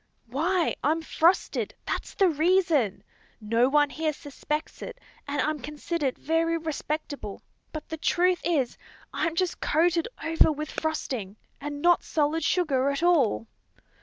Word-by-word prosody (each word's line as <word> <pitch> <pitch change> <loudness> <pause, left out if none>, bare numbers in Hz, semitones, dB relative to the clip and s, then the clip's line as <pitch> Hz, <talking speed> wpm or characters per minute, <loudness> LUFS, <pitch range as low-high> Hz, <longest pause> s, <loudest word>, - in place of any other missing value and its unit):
"Why, 325 +9 0
I'm 320 +2 +1
frosted, 335 +3 +1
that's - - -4
the 390 - +4
reason. 315 - +2 0.4
No 230 +3 +2
one 290 0 +3
here 310 -1 -1
suspects 300 +1 -5
it, - - -7 0.3
and 285 +1 -2
I'm 310 0 0
considered 295 0 -3
very 330 +2 +1
respectable; 305 -7 -4 0.3
but 310 - -7
the 320 - -5
truth 355 +2 +2
is, 290 -8 0 0.3
I'm 325 - -1
just 360 0 0
coated 335 +1 +2 0.2
over 325 -1 +4
with 305 0 -5
frosting, 250 -10 -3 0.2
and 290 0 -6
not 350 0 +5
solid 310 +1 0
sugar 280 -7 +2
at 280 +4 -2
all." 270 - +3
310 Hz, 135 wpm, -27 LUFS, 280-335 Hz, 0.4 s, not